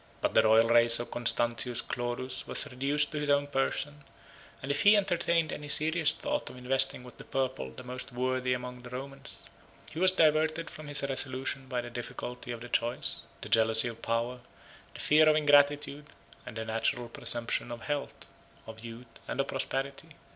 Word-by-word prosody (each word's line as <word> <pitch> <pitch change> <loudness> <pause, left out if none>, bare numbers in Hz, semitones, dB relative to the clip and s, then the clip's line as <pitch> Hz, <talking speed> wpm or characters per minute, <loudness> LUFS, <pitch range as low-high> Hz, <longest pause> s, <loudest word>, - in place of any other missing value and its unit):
But - - -1
the - - +6
royal 110 +1 +4
race 115 0 +8
of 120 - -5
Constantius 120 0 +1
Chlorus 120 +1 -4
was - - 0
reduced 140 +4 0
to 150 - -3
his 150 0 -3
own 145 0 +3
person; 145 +1 -2 0.6
and 135 - -4
if 145 - 0
he 205 +1 +6
entertained 170 -4 +1
any 145 0 -7
serious 160 +1 +3
thoughts 295 - -3
of - - -12
investing 130 0 +2
with 125 - -14
the - - -9
purple 130 - -3
the 130 - -11
most 125 +1 -7
worthy 130 +1 -1
among 125 0 -6
the 125 - -10
Romans, 135 +2 -7 0.5
he 160 - -6
was 185 +1 +5
diverted 160 -1 +2
from 155 -1 -10
his 145 -1 0
resolution 135 0 -2
by 125 -2 -2
the 120 0 -9
difficulty 120 +1 -7
of 120 -1 -7
the 120 - -9
choice, 120 0 -1 0.2
the - - -8
jealousy 110 +1 +5
of 115 -1 -10
power, 120 +2 -2 0.6
the - - -9
fear 155 +1 +5
of 155 - +4
ingratitude, 145 0 +3 0.4
and 105 - -8
the 110 - -4
natural 115 +2 -1
presumption 120 0 -2
of 120 -1 -7
health, 145 -1 -4 0.4
of 110 0 -11
youth, 115 +1 -9 0.2
and - - -5
of 135 - +1
prosperity. 135 +3 -4
130 Hz, 185 wpm, -29 LUFS, 120-145 Hz, 0.6 s, race